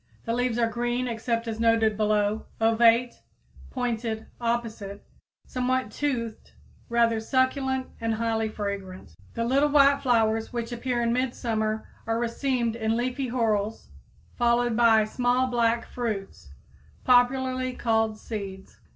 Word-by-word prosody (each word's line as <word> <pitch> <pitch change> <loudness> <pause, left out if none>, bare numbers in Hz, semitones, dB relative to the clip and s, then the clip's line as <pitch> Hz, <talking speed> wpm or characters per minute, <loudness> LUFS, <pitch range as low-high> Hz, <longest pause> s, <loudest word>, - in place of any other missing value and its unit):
The 230 - -1
leaves 245 -1 0
are 235 - +3
green, 240 +2 -1
except 230 0 -2
as 225 -1 -4
noted 225 -1 +3
below, 210 0 0
ovate, 230 +2 +3 0.5
pointed, 230 -3 -3 0.2
opposite, 230 -4 -3 0.4
somewhat 255 -2 -1
toothed, 235 -5 -3 0.4
rather 235 -1 +2
succulent 260 +2 0 0.2
and 225 -1 0
highly 225 -1 -1
fragrant. 200 - -5 0.2
The 230 - -1
little 275 +4 +3
white 280 -1 +5
flowers 225 -3 +1
which 235 0 -4
appear 240 0 -1
in 235 0 +1
midsummer 225 -4 -1 0.2
are 225 0 +1
racemed 235 0 -1
in 225 0 0
leafy 255 +2 -2
whorls, 220 -3 -1 0.5
followed 240 -1 +2
by 225 -2 +5
small 245 +3 +1
black 235 -2 +1
fruits, 195 - -5 0.5
popularly 255 +1 +2
called 225 -2 0
seeds. 195 -4 -7
230 Hz, 125 wpm, -26 LUFS, 220-250 Hz, 0.5 s, white